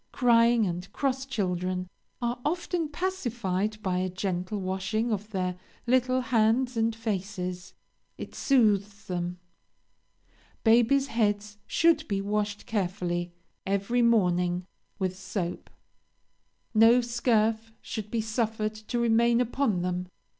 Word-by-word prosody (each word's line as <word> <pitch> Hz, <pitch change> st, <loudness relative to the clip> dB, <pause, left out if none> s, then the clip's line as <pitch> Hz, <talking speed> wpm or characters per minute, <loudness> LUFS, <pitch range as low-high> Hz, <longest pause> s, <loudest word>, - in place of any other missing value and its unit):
Crying 235 Hz, -2 st, +4 dB
and 180 Hz, +1 st, -4 dB
cross 270 Hz, -1 st, -1 dB
children 185 Hz, -5 st, -2 dB, 0.4 s
are 240 Hz, +1 st, -1 dB
often 345 Hz, 0 st, -1 dB
pacified 235 Hz, -, -2 dB
by 180 Hz, -1 st, 0 dB
a 185 Hz, 0 st, -1 dB
gentle 185 Hz, +2 st, -3 dB
washing 195 Hz, +5 st, -1 dB
of 210 Hz, 0 st, -2 dB
their 185 Hz, -3 st, -2 dB, 0.3 s
little 255 Hz, +1 st, +2 dB
hands 245 Hz, +1 st, +2 dB
and 225 Hz, 0 st, +1 dB
faces 190 Hz, -4 st, -4 dB, 0.4 s
it -, -, -8 dB
soothes 210 Hz, -6 st, +2 dB
them. 175 Hz, -1 st, -3 dB, 1.3 s
Babies' 240 Hz, +4 st, +4 dB
heads 210 Hz, -4 st, -1 dB
should 325 Hz, -2 st, +3 dB
be 200 Hz, -1 st, -1 dB
washed 205 Hz, +1 st, -2 dB
carefully, 180 Hz, -4 st, -2 dB, 0.3 s
every 200 Hz, +5 st, 0 dB
morning 180 Hz, -6 st, +2 dB, 0.3 s
with 185 Hz, -2 st, -1 dB
soap. 185 Hz, -2 st, -4 dB, 1.0 s
No 225 Hz, +2 st, +7 dB
scurf 225 Hz, -2 st, +1 dB
should 215 Hz, -1 st, -6 dB
be 230 Hz, 0 st, 0 dB
suffered 220 Hz, -1 st, -1 dB
to 215 Hz, +3 st, -5 dB
remain 235 Hz, 0 st, +3 dB
upon 245 Hz, -6 st, 0 dB
them. 180 Hz, 0 st, -2 dB
215 Hz, 115 wpm, -28 LUFS, 185-235 Hz, 1.3 s, No